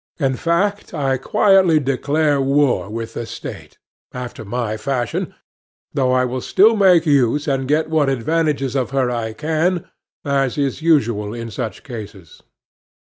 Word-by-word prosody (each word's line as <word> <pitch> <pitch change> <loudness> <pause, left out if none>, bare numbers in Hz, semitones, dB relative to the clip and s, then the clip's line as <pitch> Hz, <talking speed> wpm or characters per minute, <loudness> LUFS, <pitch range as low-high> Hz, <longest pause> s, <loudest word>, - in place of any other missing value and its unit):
In 135 -3 +1
fact, 190 +6 -1
I 135 -3 0
quietly 185 +2 +4
declare 145 +2 +1
war 135 -5 +1
with 115 +1 -5
the 120 - -5
State, - - -9 0.3
after 125 -3 -7
my 110 +1 -3
fashion, 120 +2 -3 0.6
though 130 -2 +1
I 130 0 +2
will 125 +1 -3
still 215 - +4
make 185 -5 +5
use 145 0 +2
and 135 -2 -1
get 155 +3 +1
what 155 -3 +1
advantages 140 0 0
of 130 -2 0
her 130 -2 0
I 115 -2 -3
can, 160 +6 -1 0.4
as 135 -2 0
is 140 +1 -1
usual 115 -10 +1
in 115 -1 -6
such 115 -1 -5
cases. 105 - -10
135 Hz, 145 wpm, -19 LUFS, 120-155 Hz, 0.6 s, make